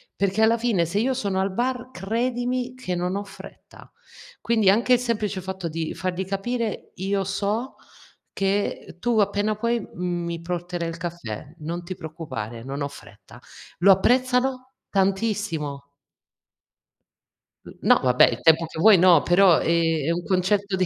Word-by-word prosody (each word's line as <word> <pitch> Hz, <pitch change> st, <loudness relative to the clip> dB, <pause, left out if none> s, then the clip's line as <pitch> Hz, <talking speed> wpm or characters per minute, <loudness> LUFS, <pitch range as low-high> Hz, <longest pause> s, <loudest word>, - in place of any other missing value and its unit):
Perché 200 Hz, +2 st, +1 dB
alla 225 Hz, +1 st, +4 dB
fine 220 Hz, -8 st, +1 dB
se 180 Hz, +5 st, -1 dB
io 255 Hz, +4 st, +1 dB
sono 200 Hz, -6 st, -1 dB
al 195 Hz, +1 st, -1 dB
bar 250 Hz, +4 st, -2 dB
credimi 245 Hz, +5 st, -2 dB
che 255 Hz, -8 st, -4 dB
non 180 Hz, +1 st, -2 dB
ho 200 Hz, -, -2 dB
fretta; 200 Hz, -1 st, -14 dB, 0.5 s
quindi 220 Hz, -4 st, +2 dB
anche 235 Hz, +5 st, +4 dB
il 245 Hz, -, +5 dB
semplice 215 Hz, -5 st, -2 dB
fatto 190 Hz, -1 st, -5 dB
di 160 Hz, 0 st, -4 dB
fargli 185 Hz, 0 st, -3 dB
capire: 215 Hz, +3 st, -3 dB
"Io 195 Hz, +1 st, -1 dB
so 205 Hz, +6 st, -2 dB, 0.6 s
che 195 Hz, -1 st, -2 dB
tu 240 Hz, +3 st, 0 dB
appena 205 Hz, +1 st, +1 dB
puoi 235 Hz, +1 st, -1 dB
mi 175 Hz, -1 st, -3 dB
porterai 175 Hz, 0 st, -4 dB
il 165 Hz, 0 st, -5 dB
caffè, 165 Hz, -5 st, -7 dB
non 170 Hz, +3 st, -4 dB
ti 185 Hz, +2 st, -6 dB
preoccupare, 145 Hz, -10 st, -7 dB
non 140 Hz, +3 st, -4 dB
ho -, -, -1 dB
fretta." 140 Hz, -, -15 dB, 0.4 s
Lo 195 Hz, +3 st, +7 dB
apprezzano 255 Hz, +4 st, +1 dB, 0.2 s
tantissimo. 195 Hz, -8 st, -1 dB, 1.8 s
N -, -, -10 dB
no, -, -, +5 dB
vabbè, 125 Hz, -1 st, +5 dB
il 115 Hz, -, -4 dB
tempo 160 Hz, +2 st, +5 dB
che 160 Hz, -, -9 dB
vuoi 210 Hz, +3 st, +7 dB
no, 175 Hz, -3 st, +6 dB
però 175 Hz, -1 st, +5 dB
è 165 Hz, -3 st, +1 dB
è 165 Hz, -, +1 dB
un 175 Hz, +1 st, -2 dB
concetto 195 Hz, +2 st, +1 dB
di 185 Hz, 0 st, +1 dB
190 Hz, 155 wpm, -24 LUFS, 170-220 Hz, 1.8 s, Lo